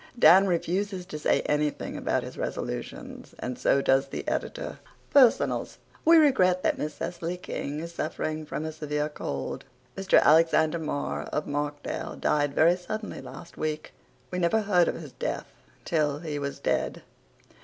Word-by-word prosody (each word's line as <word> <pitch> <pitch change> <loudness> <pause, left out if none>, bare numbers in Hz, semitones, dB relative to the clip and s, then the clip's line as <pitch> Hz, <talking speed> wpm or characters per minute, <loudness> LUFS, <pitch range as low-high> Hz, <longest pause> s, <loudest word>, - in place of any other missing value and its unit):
Dan 195 -3 +7
refuses 185 +2 -1
to 155 -5 -7
say - - +2
anything 150 0 -1
about - - -1
his - - -8
resolutions - - -5
and 125 - -4
so 140 - +3
does 135 +1 +3
the - - -6
editor. - - -3 0.3
PERSONALS 260 -5 +4 0.3
We 330 +1 +7
regret 185 - +4
that - - +1
Miss 150 -1 -3
Cecily 175 +2 -4
King 150 -4 -5
is 170 +1 -7
suffering 155 -1 -3
from 155 - -4
a 160 - -3
severe 150 -1 -2
cold. 70 - -5 0.3
Mr. 195 0 +4
Alexander 160 +1 +4
Marr 150 -2 -3
of 150 - -3
Markdale 145 0 -3
died 145 -1 +1
very 170 +3 +5
suddenly 215 +4 -5
last 170 - -11
week. 155 0 -3 0.4
We 180 - -2
never 180 +5 +2
heard 180 -5 +3
of - - -1
his 150 -5 -9
death - - -3 0.4
till 150 -3 +1
he 150 -2 -4
was 140 0 -4
dead. - - -1
160 Hz, 155 wpm, -27 LUFS, 150-180 Hz, 0.4 s, Dan